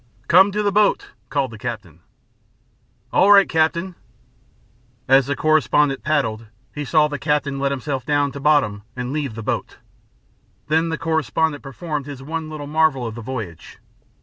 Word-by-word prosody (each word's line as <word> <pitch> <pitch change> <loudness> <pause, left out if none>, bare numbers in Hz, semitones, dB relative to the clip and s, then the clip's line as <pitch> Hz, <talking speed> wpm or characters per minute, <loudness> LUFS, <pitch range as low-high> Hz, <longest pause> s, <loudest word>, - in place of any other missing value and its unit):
"Come 190 +4 +6
to 210 +1 0
the 205 - +1
boat," 205 0 +2 0.2
called 140 -4 -1
the 110 - -11
captain. 105 -10 -6 1.1
"All 200 - +5
right, 200 -1 +7
captain." 165 +3 0 1.1
As 135 0 +5
the 145 - -1
correspondent 150 -2 +2
paddled, 115 -7 -1 0.3
he 150 -1 -5
saw 155 +1 +3
the 145 -2 -5
captain 145 -1 -1
let 140 0 0
himself 135 -1 -3
down 145 -1 +1
to 140 - -8
bottom 140 -9 +2
and 125 +1 -4
leave 140 -7 -3
the 115 - -6
boat. - - -3 0.9
Then 160 +2 +2
the 165 - -2
correspondent 160 -1 -1
performed 145 +1 -5
his 140 -2 -8
one 160 +2 -5
little 155 -2 -7
marvel 150 -4 +1
of 115 - -4
the 120 - -8
voyage. 110 -9 -7
145 Hz, 160 wpm, -21 LUFS, 130-160 Hz, 1.1 s, right